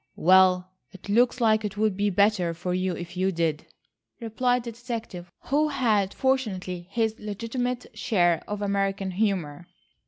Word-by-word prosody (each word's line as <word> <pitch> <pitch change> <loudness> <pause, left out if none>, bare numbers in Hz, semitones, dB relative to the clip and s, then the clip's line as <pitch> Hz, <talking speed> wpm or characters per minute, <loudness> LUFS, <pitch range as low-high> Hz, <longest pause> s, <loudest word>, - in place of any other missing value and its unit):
"Well, 185 +1 +4 0.2
it 190 +1 -13
looks 245 +4 +3
like 220 -2 +3
it 210 0 -4
would 215 -2 +1
be 205 +1 +1
better 195 -3 +2
for 180 +2 -3
you 185 0 0
if 175 +1 -8
you 190 +1 +1
did," 165 -3 -1 0.5
replied 245 +2 0
the 235 - -5
detective, 225 -7 -7
who 295 +3 +1
had 215 -9 +1
fortunately 190 -10 -1
his 225 +1 -1
legitimate 235 +4 -3
share 175 -9 +2
of 205 0 -4
American 195 -1 -1
humour. 180 -5 -2
200 Hz, 150 wpm, -26 LUFS, 180-230 Hz, 0.5 s, Well